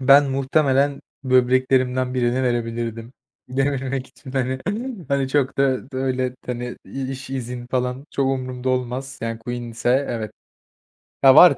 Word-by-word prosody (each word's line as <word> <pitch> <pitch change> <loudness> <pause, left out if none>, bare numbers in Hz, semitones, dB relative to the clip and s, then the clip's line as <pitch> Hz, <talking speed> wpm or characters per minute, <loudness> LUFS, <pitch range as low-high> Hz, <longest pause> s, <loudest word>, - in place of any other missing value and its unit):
Ben 140 +1 +6
muhtemelen 135 +1 +2 0.2
böbreklerimden 130 0 +3
birini 125 +1 +1
verebilirdim. 115 -1 -2 0.4
Dememek 135 0 -1
için, 130 0 -13
hani. 130 -1 0 0.5
Hani, 140 -2 +1
çok 135 -1 +1
da 135 -1 +1
da - - -5
öyle, 130 -1 0
hani, 120 0 -4
i 135 -1 -4
iş, 135 0 -6
izin, 125 -2 -4
falan, 125 +2 -2
çok 135 - 0
umurumda 130 -1 -2
olmaz. 130 +1 -2
Yani, 115 0 -2
Queen 120 +1 -4
ise, 120 +4 +1
evet. 110 -3 -3 0.9
Ya, 135 0 +9
var, 155 -5 +9
130 Hz, 140 wpm, -22 LUFS, 125-135 Hz, 0.9 s, Ya